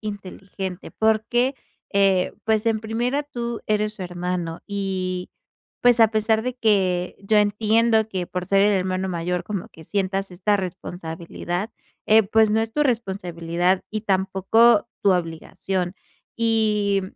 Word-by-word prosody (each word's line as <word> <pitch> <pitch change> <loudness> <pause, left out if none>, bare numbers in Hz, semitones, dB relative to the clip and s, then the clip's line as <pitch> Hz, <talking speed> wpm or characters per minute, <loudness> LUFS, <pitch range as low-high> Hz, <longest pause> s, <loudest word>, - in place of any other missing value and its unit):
inteligente, 195 -2 -7
porque, 240 +4 +1 0.4
eh, 195 -2 +3
pues, 220 0 +1
en 225 -1 +2
primera 240 +6 -1
tú 235 -4 -5
eres 215 0 0
su 195 - -7
hermano 175 -1 -4
y, 190 -3 -3 0.5
pues, 245 -1 +5
a 225 - +8
pesar 220 0 +1
de 255 0 -3
que 190 -6 +1
yo 205 +2 +1
entiendo 220 +2 +2
que 185 -4 -3
por 180 0 -4
ser 195 +1 +3
el 210 - +4
hermano 185 0 -1
mayor, 175 0 -2
como 200 -4 -5
que 160 - -14
sientas 195 +1 -2
esta 205 +3 +1
responsabilidad, 175 +1 -5 0.4
eh, 220 +1 +6
pues, 220 +2 +3
no 220 +1 +2
es 225 0 -3
tu 295 - +1
responsabilidad 180 - 0
y 215 -1 -3
tampoco 195 +3 +3
tu 195 - +5
obligación. 180 +2 -3 0.4
Y 215 -3 +1
200 Hz, 140 wpm, -23 LUFS, 185-220 Hz, 0.5 s, a